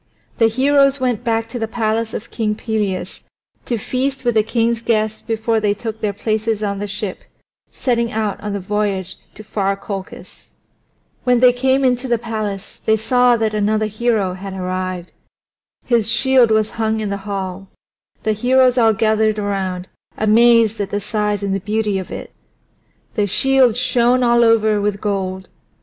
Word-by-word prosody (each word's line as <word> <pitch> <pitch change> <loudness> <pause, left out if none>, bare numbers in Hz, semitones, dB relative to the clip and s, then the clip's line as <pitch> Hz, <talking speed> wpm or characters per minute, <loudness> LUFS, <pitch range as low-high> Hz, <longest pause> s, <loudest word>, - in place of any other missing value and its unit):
The 225 - +6
heroes 275 +3 +3
went 245 -3 -1
back 225 -1 0
to 240 +1 -5
the 225 - -2
palace 225 0 -1
of 220 - -7
King 215 -2 -1
Pelias 210 -4 -3 0.5
to 240 - 0
feast 260 +5 -2
with 240 - +2
the 220 - +4
king's 230 +1 0
guests 220 -2 0
before 225 0 -1
they 205 -1 +1
took 220 0 -6
their 210 - 0
places 215 +1 -1
on 200 -1 -2
the 205 - -3
ship, 205 -1 -4 0.5
setting 235 -2 -1
out 215 -3 -2
on 210 -1 -4
the 200 - -2
voyage 195 -1 -2 0.2
to 215 - -10
far 200 -2 -1
Colchis. 195 -1 -8 0.8
When 250 -1 +3
they 250 0 +6
came 265 +2 +1
into 250 0 +1
the 240 -1 +2
palace 215 -3 -5
they 220 0 +3
saw 245 +2 +3
that 220 -1 -1
another 215 +1 +1
hero 215 -3 0
had 190 +1 -7
arrived. 185 -1 -4 0.7
His 230 -3 +1
shield 260 -1 +4
was 220 0 +2
hung 220 0 0
in 210 -2 -3
the 200 - -2
hall; 195 -1 -4 0.6
the 215 - +1
heroes 255 +3 +3
all 225 -2 +5
gathered 220 0 +1
around, 190 -3 -3 0.3
amazed 225 0 +4
at 200 - -3
the 205 - -1
size 210 -1 -2
and 195 -1 -1
the 195 - 0
beauty 210 0 -1
of 185 - -7
it. - - -8 0.8
The 205 -1 0
shield 260 +2 +3
shone 250 0 +2
all 235 0 +4
over 220 -2 +3
with 205 -1 -1
gold. 190 -2 -3
220 Hz, 170 wpm, -19 LUFS, 205-235 Hz, 0.8 s, The